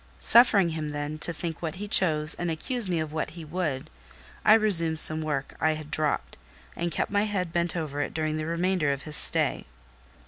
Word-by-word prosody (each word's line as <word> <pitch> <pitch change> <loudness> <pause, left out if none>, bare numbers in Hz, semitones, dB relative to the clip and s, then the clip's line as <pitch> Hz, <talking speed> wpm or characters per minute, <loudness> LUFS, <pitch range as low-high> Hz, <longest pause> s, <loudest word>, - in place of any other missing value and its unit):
Suffering 215 -7 +4
him, 155 -2 -5
then, 145 +1 -5
to 170 - +1
think 165 0 -6
what 160 -2 -5
he 205 +3 -7
chose 155 -6 +4
and 175 - -4
accuse 210 - -3
me 175 -2 -1
of 155 -1 -5
what 155 - -3
he 165 - -9
would, 155 -4 -4 0.6
I 215 - +6
resumed 170 -8 +4
some 155 0 +2
work 150 -3 -4
I 155 0 +2
had 155 -1 -10
dropped, 155 -2 -2 0.4
and 170 0 -4
kept - - -3
my 205 +1 0
head 185 -5 -4
bent 170 0 -2
over 150 -4 -4
it - - -4
during 155 -1 -3
the 155 0 -5
remainder 170 -2 -1
of 140 0 -5
his 155 -1 0
stay. - - +4
160 Hz, 205 wpm, -25 LUFS, 155-180 Hz, 0.6 s, I